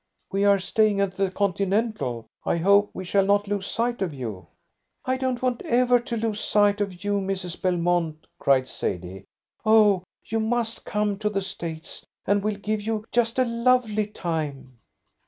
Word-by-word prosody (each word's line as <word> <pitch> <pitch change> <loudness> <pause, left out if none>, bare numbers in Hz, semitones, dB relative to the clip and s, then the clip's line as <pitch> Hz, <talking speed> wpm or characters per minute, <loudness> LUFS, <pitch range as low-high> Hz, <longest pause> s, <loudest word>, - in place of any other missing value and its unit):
"We 195 +1 +1
are 200 0 +6
staying 205 +2 +2
at 195 -1 0
the 195 0 +1
Continental. 195 - -1 0.2
I - - +1
hope 200 +4 +4
we 185 - -7
shall 195 +2 +3
not 205 +1 +2
lose 200 -1 -2
sight 235 0 -1
of 175 -6 -2
you." 110 -8 -6 0.6
"I 260 - +1
don't 260 -1 -2
want 250 -2 0
ever 245 0 +3
to 240 -1 -4
lose 220 -1 -1
sight 205 -1 +3
of 185 -2 -4
you, 205 0 +1
Mrs. 190 -3 -3
Belmont," 175 -3 0
cried 130 -2 +3
Sadie. 90 +2 -4 0.4
"Oh, 215 -4 +5 0.2
you 225 - -1
must 230 +1 -1
come 210 -1 -1
to 210 -1 0
the 200 -2 -1
States, 165 -3 -6 0.2
and 205 +1 +2
we'll 210 -1 -1
give 210 +1 -2
you 215 0 -2
just 230 0 +1
a 255 - +4
lovely 235 -3 +2
time." 150 - -4
205 Hz, 170 wpm, -25 LUFS, 180-220 Hz, 0.6 s, are